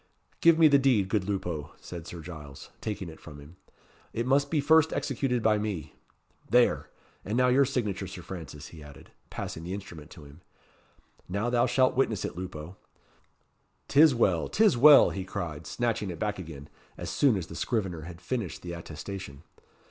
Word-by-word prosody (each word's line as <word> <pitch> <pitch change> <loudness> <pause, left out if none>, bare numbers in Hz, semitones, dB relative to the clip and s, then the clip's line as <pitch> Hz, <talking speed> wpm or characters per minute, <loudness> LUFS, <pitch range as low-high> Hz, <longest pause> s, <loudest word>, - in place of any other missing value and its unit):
"Give 170 -1 +6
me 165 -1 +7
the 140 -2 +5
deed, 120 -8 +2
good 100 -3 0
Lupo," 90 -7 -3
said 85 -2 -9
Sir 85 -1 -8
Giles, 75 -5 -10
taking 105 -4 -4
it 80 - -11
from 75 -2 -11
him. 75 +5 -14 0.6
"It 115 - -2
must 140 +2 +2
be 155 - +1
first 160 +2 +4
executed 125 -3 -1
by 110 -1 +3
me 95 -8 -4 0.6
there! 120 0 +3 0.3
and 105 +4 -2
now 125 0 +4
your 135 +2 +5
signature, 105 -7 -2
Sir 90 -2 -9
Francis," 75 -6 -8
he 80 - -12
added, 75 -1 -14 0.2
passing 80 - -6
the 90 +3 -4
instrument 85 -6 -10
to 80 - -13
him. 70 +4 -15 0.9
"Now 100 +6 -1
thou 120 0 +3
shalt 130 +1 +2
witness 115 -7 +1
it, - - -5
Lupo. 90 -1 -7 1.1
'Tis 150 -1 +6
well! 95 -8 +2
'tis 215 - +4
well!" 145 +4 +8
he 95 - -4
cried, 90 -6 -5
snatching 115 -4 -1
it 85 - -5
back 105 -2 -2
again, 75 -5 -9 0.3
as - - -5
soon 130 -7 +3
as 90 - -4
the - - -11
scrivener 95 -8 -2
had 85 +1 -9
finished 95 +1 -4
the 85 -1 -5
attestation. 85 -2 -8
95 Hz, 180 wpm, -28 LUFS, 85-125 Hz, 1.1 s, well